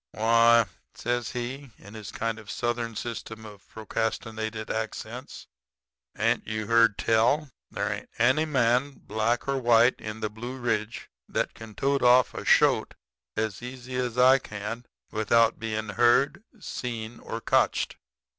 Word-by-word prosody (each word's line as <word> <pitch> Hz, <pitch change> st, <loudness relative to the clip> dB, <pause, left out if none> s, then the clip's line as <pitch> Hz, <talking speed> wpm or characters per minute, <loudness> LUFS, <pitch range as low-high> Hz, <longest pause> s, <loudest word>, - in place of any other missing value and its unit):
"'Why,' 115 Hz, +1 st, +5 dB, 0.3 s
says 120 Hz, -1 st, -2 dB
he, 130 Hz, +3 st, -5 dB
in 100 Hz, +2 st, -14 dB
his 110 Hz, -2 st, -8 dB
kind 115 Hz, -1 st, -3 dB
of 105 Hz, -2 st, -13 dB
Southern 120 Hz, -1 st, -2 dB
system 110 Hz, -1 st, -6 dB
of 105 Hz, -2 st, -13 dB
procrastinated 110 Hz, 0 st, -3 dB
accents, 110 Hz, 0 st, -5 dB, 0.7 s
'hain't -, -, 0 dB
you 110 Hz, 0 st, -3 dB
heard 115 Hz, -1 st, +4 dB
tell? 120 Hz, +6 st, +2 dB, 0.2 s
There -, -, -2 dB
ain't -, -, -8 dB
any 130 Hz, +7 st, +3 dB
man, 130 Hz, -1 st, +2 dB
black 110 Hz, +4 st, 0 dB
or 135 Hz, -1 st, 0 dB
white, 120 Hz, 0 st, +4 dB
in 110 Hz, +1 st, -6 dB
the 110 Hz, -, -1 dB
Blue 120 Hz, +4 st, -7 dB
Ridge 115 Hz, -2 st, -2 dB, 0.2 s
that -, -, -1 dB
can 110 Hz, -2 st, -11 dB
tote 140 Hz, +5 st, +1 dB
off 125 Hz, 0 st, +5 dB
a -, -, -6 dB
shoat -, -, +3 dB, 0.4 s
as 110 Hz, -2 st, -2 dB
easy 125 Hz, +1 st, -7 dB
as 125 Hz, -1 st, -2 dB
I 130 Hz, +2 st, +6 dB
can 105 Hz, +2 st, -6 dB, 0.2 s
without 115 Hz, +1 st, +3 dB
bein' 110 Hz, -1 st, -3 dB
heard, 120 Hz, -, +3 dB, 0.2 s
seen, 115 Hz, -, -5 dB
or 115 Hz, -, -6 dB
cotched. -, -, +1 dB
115 Hz, 145 wpm, -27 LUFS, 110-125 Hz, 0.7 s, I